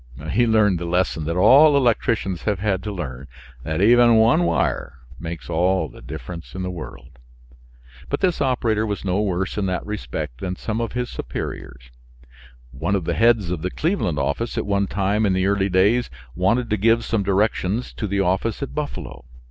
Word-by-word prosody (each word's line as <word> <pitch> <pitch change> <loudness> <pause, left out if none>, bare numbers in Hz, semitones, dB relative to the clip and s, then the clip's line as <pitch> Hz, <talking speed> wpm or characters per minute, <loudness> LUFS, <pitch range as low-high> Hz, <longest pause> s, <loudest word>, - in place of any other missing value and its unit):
He 120 +3 +3
learned 105 -5 +3
the 85 - -4
lesson 85 -2 0
that 85 +2 -2
all 140 +10 +6
electricians 115 - +1
have 105 -2 -1
had 95 -1 -1
to 105 +2 -5
learn 70 -8 -6 0.3
that 80 +7 -1
even 120 +1 +6
one 115 +10 +4
wire 70 - -1 0.2
makes 85 0 -7
all 90 +3 +1
the - - -14
difference 85 +8 -8
in 95 - -4
the 90 - -3
world. 65 -5 -10 0.9
But - - -1
this 180 -5 +1
operator 120 -5 +1
was 105 -1 -4
no 95 +2 +1
worse 95 0 -1
in 100 - 0
that 90 -1 -2
respect 65 - -5
than 90 0 -3
some 110 +4 -3
of 115 - -3
his 125 0 -3
superiors. 60 -1 -7 0.8
One 80 +9 -1
of 95 - -1
the - - 0
heads 115 -6 +3
of 90 -3 -3
the 90 - -2
Cleveland 155 - -1
office 70 - -2
at - - -1
one 100 -1 0
time 100 +3 0
in 100 -3 +2
the 95 0 +1
early 100 0 +1
days 100 +7 +2 0.2
wanted 115 - +1
to 105 - +2
give 115 +3 +2
some 115 -2 0
directions 100 +2 0
to 105 - -4
the 100 0 0
office 95 +7 0
at 140 - -6
Buffalo. 145 - -5
100 Hz, 190 wpm, -22 LUFS, 85-115 Hz, 0.9 s, all